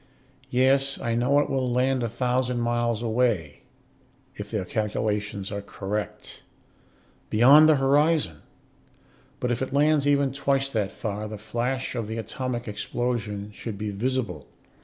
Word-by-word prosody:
Yes, 135 +2 +2
I 115 - -1
know, 125 +5 +2
it 145 - +3
will 130 -3 -1
land 130 +1 +1
a 120 - -1
thousand 125 +1 0
miles 120 -1 0
away, 110 -10 0 0.7
if 105 0 -8
their 105 -4 -2
calculations 105 -1 -2
are 100 -1 -3
correct. 100 +1 -5 0.9
Beyond 140 +8 +7
the 155 - +6
horizon. 140 - +2 1.0
But 125 - -1
if 120 - -1
it 130 - -3
lands 145 0 +3
even 140 -2 +2
twice 135 0 0
that 105 -6 -1
far 105 0 -4
the 105 0 -6
flash 120 +5 -2
of 115 -4 -3
the 110 +1 -4
atomic 120 +2 -4
explosion 105 -1 -3
should 105 -1 -6
be 105 0 -3
visible. 105 - -2
120 Hz, 140 wpm, -25 LUFS, 105-135 Hz, 1.0 s, Beyond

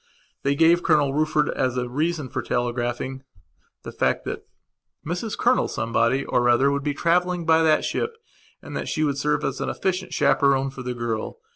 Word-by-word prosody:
They 140 +1 +1
gave 165 +3 +4
Colonel 150 -5 +2
Rufford, 155 0 +1
as 130 -1 -1
a 125 0 -1
reason 155 +3 -1
for 130 - -3
telegraphing, 120 +2 -2 0.6
the - - -7
fact - - 0
that - - -6 0.6
Mrs 180 +7 -3
Colonel 250 +1 +2
Somebody 115 +4 0
or 120 0 +2
other 130 +4 +4
would 140 0 -1
be 145 0 -2
travelling 175 +1 +1
by 160 0 +4
that 155 -1 +3
ship 460 0 -2 0.5
and - - -8
that - - -3
she 155 - -1
would 140 -2 0
serve 150 +1 0
as 135 0 -2
an - - -1
efficient 185 0 -2
chaperon 135 -1 +2
for 135 - -9
the 125 -1 -4
girl. 115 - -3
140 Hz, 180 wpm, -24 LUFS, 125-165 Hz, 0.6 s, gave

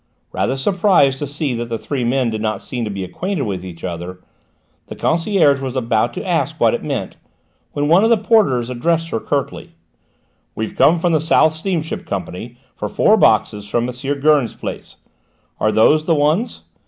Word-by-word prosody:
Rather 135 - -1
surprised 170 -4 +2
to 145 - -3
see 145 -1 -2
that 120 0 -4
the 115 - -2
three 135 +2 -3
men 125 0 +1
did 110 -1 -4
not 110 -2 -1
seem 125 -3 -4
to 110 - -3
be 100 -1 -4
acquainted 180 - -3
with 95 -6 -4
each 85 -3 -10
other, 90 +1 -6 0.7
the - - -8
concierge 165 -4 +2
was 130 -1 -4
about 115 -4 +1
to - - -6
ask - - -1
what - - +3
it - - -3
meant, - - -4 0.6
when 145 0 -1
one 170 +6 +5
of 225 - +3
the 230 - +5
porters 195 - +2
addressed 165 +6 0
her 115 - -2
curtly: - - -4 0.8
"We've 110 0 -4
come 170 - +4
from 170 0 +1
the 155 - +2
South 160 -1 +3
Steamship 160 -1 -3
Company 100 +5 -6 0.2
for 105 - -4
four 215 - +4
boxes 105 - +2
from 120 +2 0
M. 135 +3 -4
Gurn's 150 -4 +3
place. - - -7 0.6
Are 110 - +2
those 155 +9 +4
the 165 - +2
ones?" 155 +10 0
135 Hz, 185 wpm, -18 LUFS, 110-160 Hz, 0.8 s, one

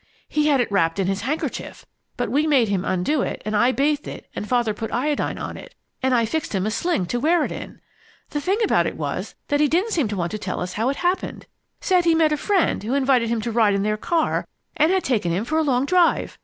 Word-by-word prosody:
He 300 0 +1
had 285 -3 +3
it 240 - 0
wrapped 165 -4 +2
in 195 - +1
his 195 +1 -1
handkerchief, 280 +8 -4 0.3
but - - -2
we 300 +3 +2
made 260 -8 +3
him 195 -2 0
undo 185 +12 0
it, - - -3
and 215 0 -1
I 240 +5 +4
bathed 290 +2 0
it - - -8
and 210 - -5
Father 240 -3 +1
put 225 +1 -5
iodine 285 +5 -1
on, - - -6 0.4
and 260 -1 +2
I 230 -1 +3
fixed 295 -1 -3
him 190 0 0
a 215 - 0
sling 335 - 0
to 240 +8 -2
wear 320 +4 +3
it - - -5
in. - - -8 0.5
The 295 - -2
thing 380 +7 +1
about - - +2
it - - -5
was - - -4
that 290 - +2
he 300 - +4
didn't 365 +10 +1
seem 300 -9 +1
to 205 -1 -4
want 170 -1 -2
to 215 - -4
tell 190 -3 -4
us 180 0 -4
how 225 +6 0
it 275 - -1
happened. 360 +2 -1 0.4
Said 365 -2 +2
he 335 -1 +4
met 320 -1 +3
a 300 - +1
friend 385 +2 +1
who 230 +6 -2
invited 260 -4 +2
him 230 -1 0
to 235 - -3
ride 220 -3 +3
in 200 - 0
their 215 0 +1
car 320 +9 0 0.3
and 310 +3 +3
had 380 -1 +1
taken 210 -10 0
him 190 +6 -1
for 315 +5 0
a - - +2
long 265 -3 +1
drive. 355 +2 +2
255 Hz, 255 wpm, -22 LUFS, 215-310 Hz, 0.5 s, I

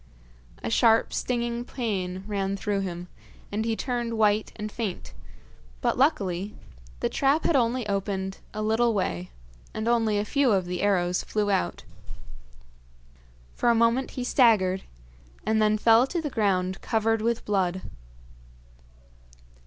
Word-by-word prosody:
A 110 - -2
sharp, 225 - +4
stinging 240 -1 -1
pain 190 -8 -3
ran 200 -1 -2
through 200 0 -1
him, 180 -2 -4 0.4
and 215 +2 -1
he 225 -1 0
turned 240 -2 -2
white 215 0 +2
and 215 0 -5
faint, 210 -6 -5 0.7
but, - - +1
luckily, 205 - 0 0.5
the - - +2
trap 280 +3 +1
had 335 - +2
only 240 -2 +1
opened 195 -1 -2
a 215 0 -4
little 225 +1 +2
way, 90 - -2 0.5
and 215 +1 -2
only 225 -3 +2
a 205 - 0
few 275 0 +2
of 190 -2 +1
the 180 0 -3
arrows 180 -3 +1
flew 210 -1 -1
out. 90 - -1 1.7
For 240 - +1
a 235 - +4
moment 230 +3 +2
he 250 - -1
staggered, 210 -8 +3 0.6
and 220 +1 +2
then 215 0 +3
fell 225 +3 +5
to 345 - -2
the 300 -3 -4
ground 190 -5 0
covered 225 0 +1
with 230 +1 -1
blood. 190 -2 0
215 Hz, 140 wpm, -26 LUFS, 195-235 Hz, 1.7 s, fell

